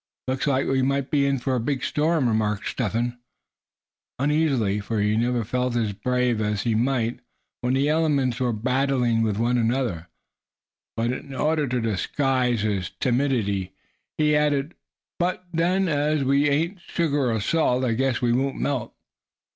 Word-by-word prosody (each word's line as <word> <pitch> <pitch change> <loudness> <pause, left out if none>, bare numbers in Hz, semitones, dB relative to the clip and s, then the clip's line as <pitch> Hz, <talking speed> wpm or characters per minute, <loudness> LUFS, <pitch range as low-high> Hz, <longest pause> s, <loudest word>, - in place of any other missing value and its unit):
"Looks 130 +2 -1
like 135 -1 +2
we 135 0 +1
might 140 +1 0
be 140 -2 +3
in 140 0 +1
for 130 +1 -2
a 125 - +1
big 130 +2 -2
storm," 155 -2 +1
remarked 105 -2 0
Step 110 -6 -2
Hen 120 +1 -1 1.0
uneasily, 140 -8 +1
for 105 +2 -3
he 105 +1 +2
never 120 +1 +1
felt 125 +2 -1
as 110 -4 0
brave 125 +1 0
as 105 -2 -1
he 115 - +1
might 120 0 0 0.4
when 125 +1 0
the 140 +2 +2
elements 145 -5 +1
were 125 -2 +1
battling 125 0 +1
with 110 -3 0
one 120 +2 +1
another; 115 -8 -1 0.9
but 115 +2 +1
in 135 +1 -6
order 150 +1 +1
to 125 0 -1
disguise 125 +3 0
his 100 -4 -1
timidity 120 -8 0 0.4
he 150 -1 +3
added: 150 +1 +1 0.5
"but 185 +1 -1
then, 180 +3 +2
as 150 -1 +1
we 140 +2 +3
ain't 165 +6 0
sugar 145 -8 0
or 110 - 0
salt, 130 +1 +1
I 120 -3 +1
guess 130 0 0
we 120 -1 +3
won't 135 +2 0
melt." 135 -6 -2
125 Hz, 165 wpm, -24 LUFS, 115-140 Hz, 1.0 s, be